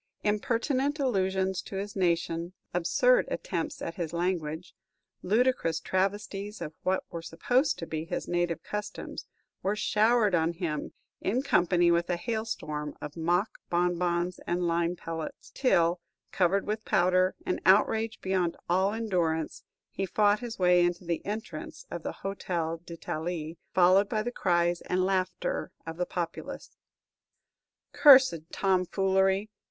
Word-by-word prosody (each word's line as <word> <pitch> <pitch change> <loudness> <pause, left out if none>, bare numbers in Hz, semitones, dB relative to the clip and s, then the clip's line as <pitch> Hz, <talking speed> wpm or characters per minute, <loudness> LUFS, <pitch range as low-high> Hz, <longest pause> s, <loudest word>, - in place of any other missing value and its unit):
Impertinent 255 +7 0
allusions 190 -7 0
to - - -9
his 200 +1 -4
nation, 170 -1 0 0.2
absurd - - +3
attempts - - -3
at 165 - -5
his 170 -2 -3
language, 170 -1 -2 0.5
ludicrous 210 -5 +2
travesties 200 +2 -2
of 160 -2 -6
what 190 0 0
were 170 - -5
supposed 245 - +1
to 165 - -5
be 160 -1 -4
his - - -4
native 175 -1 -1
customs, 210 0 -6 0.3
were 200 +2 0
showered 215 0 +3
on 165 0 +2
him, 165 -4 -3 0.3
in 240 +7 0
company 175 -7 +3
with 170 +1 +1
a 175 - +2
hailstorm 175 -8 -4
of 145 - -7
mock 175 +5 0
bonbons 175 0 0
and 175 +1 0
lime 170 +1 +1
pellets; 165 -2 -7
till, 175 -9 +2 0.3
covered 190 +2 +2
with 215 +1 -2
powder, 185 0 +3
and 180 - -1
outraged 220 +3 +3
beyond 185 -3 0
all 190 +3 +2
endurance, 175 -8 -1 0.3
he 195 - -3
fought 205 +2 +3
his 240 -2 -6
way 180 -1 +5
into 175 0 -1
the 170 -1 -2
entrance 205 -7 -6
of 170 - -4
the - - -7
Hôtel 170 -4 -3
d'Italie, 165 -1 -4 0.2
followed 185 +3 +5
by 215 -2 0
the 245 - -3
cries 175 -5 +1
and 185 0 0
laughter 185 -1 -1
of 165 0 -6
the 180 - -1
populace. 175 -2 -5 1.2
"Cursed 260 - +7
tomfoolery! 190 +2 +1
180 Hz, 135 wpm, -29 LUFS, 170-205 Hz, 1.2 s, Cursed